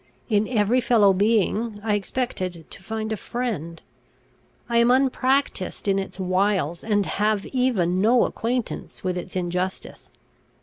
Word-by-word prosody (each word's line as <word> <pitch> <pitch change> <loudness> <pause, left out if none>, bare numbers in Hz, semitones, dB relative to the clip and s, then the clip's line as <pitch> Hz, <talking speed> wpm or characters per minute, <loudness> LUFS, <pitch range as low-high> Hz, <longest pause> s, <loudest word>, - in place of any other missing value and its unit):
In 210 -1 +2
every 235 +1 +2
fellow 220 -5 +4
being 215 +2 +1
I 220 -2 0
expected 190 -6 -3
to - - -8
find 220 +1 -4
a - - -1
friend. 205 -9 -4 0.9
I 235 -1 +1
am 235 +1 +5
unpractised 260 -5 +1
in 195 0 +2
its 195 0 -6
wiles, 185 -3 0
and 205 -2 +1
have 210 0 0
even 195 -9 +1
no 235 +4 +4
acquaintance 240 +1 -4
with 185 -1 -1
its 180 +1 -6
injustice. 180 +1 -3
210 Hz, 135 wpm, -24 LUFS, 185-235 Hz, 0.9 s, am